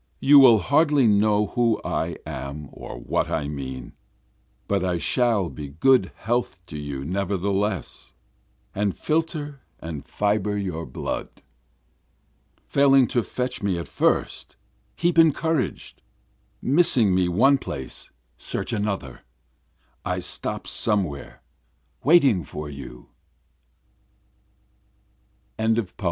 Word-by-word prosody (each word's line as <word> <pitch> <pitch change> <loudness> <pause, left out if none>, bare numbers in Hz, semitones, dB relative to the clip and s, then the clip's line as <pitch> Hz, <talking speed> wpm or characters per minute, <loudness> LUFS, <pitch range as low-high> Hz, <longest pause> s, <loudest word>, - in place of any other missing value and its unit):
You 145 +1 +7
will 125 -5 +8
hardly 145 - +3
know 105 0 +3
who 115 +1 +1
I 85 +1 -2
am 70 -1 -6
or - - -9
what - - -1
I 75 -3 -1
mean, 65 -3 -6 0.7
But 100 -2 0
I 90 -2 0
shall 110 - +1
be 75 0 -7
good 95 - +3
health 120 -3 -2
to 75 - -8
you 70 -2 -5
nevertheless, 100 +2 -2 0.6
And 100 -4 -1
filter 150 -3 -2 0.2
and 80 -4 -6
fibre 105 +2 -1
your 90 -5 -4
blood. 65 - -4 1.4
Failing 135 -2 +5
to 120 - +1
fetch 125 +3 -4
me 100 -3 0
at 85 - -5
first - - -1 0.4
keep 170 -1 +2
encouraged, 160 -2 +1 0.6
Missing 130 - +4
me 90 -1 +2
one 130 +10 +4
place 65 - -7 0.3
search - - -3
another, 100 - -3 0.8
I - - -2
stop - - -3
somewhere 85 -11 -2 0.6
waiting 140 - +5
for 75 +1 -7
you. 70 -3 -10 2.5
BOOK 110 0 +2
IV. 105 -6 -2
100 Hz, 110 wpm, -24 LUFS, 80-125 Hz, 2.5 s, will